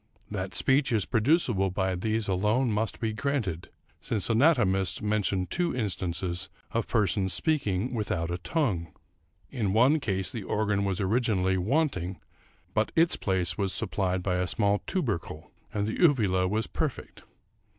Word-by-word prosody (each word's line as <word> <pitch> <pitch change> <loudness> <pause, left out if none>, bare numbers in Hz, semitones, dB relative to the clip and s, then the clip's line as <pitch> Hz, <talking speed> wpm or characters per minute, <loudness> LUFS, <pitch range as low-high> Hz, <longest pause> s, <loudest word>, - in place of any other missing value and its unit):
That 95 -2 -4
speech 135 0 +2
is 110 -4 +2
producible 115 - +2
by 95 0 -1
these 110 +4 -1
alone 105 +6 +1
must 110 +1 -1
be 110 -2 -1
granted, 110 - -2 0.3
since 110 0 -1
anatomists 110 - +3
mention 105 -3 0
two 170 - -1
instances 95 -4 -2 0.2
of 115 -1 -1
persons 100 -4 +1
speaking 125 - 0
without 90 -7 -2
a 85 - -3
tongue. 90 - -1 0.6
In 110 -8 -1
one 130 +8 +5
case 95 -8 -2
the 115 - -5
organ 100 0 0
was 95 -2 -1
originally 95 -3 +1
wanting, 95 - 0 0.5
but 110 0 +1
its 165 +1 +4
place 95 -1 -1
was 95 -2 0
supplied 95 -4 -1
by 90 -1 0
a 90 0 0
small 100 0 +1
tubercle, 100 - -3 0.2
and 105 -1 -1
the 110 - -3
uvula 105 - +3
was 110 +3 0
perfect. - - -4
105 Hz, 145 wpm, -28 LUFS, 95-115 Hz, 0.6 s, one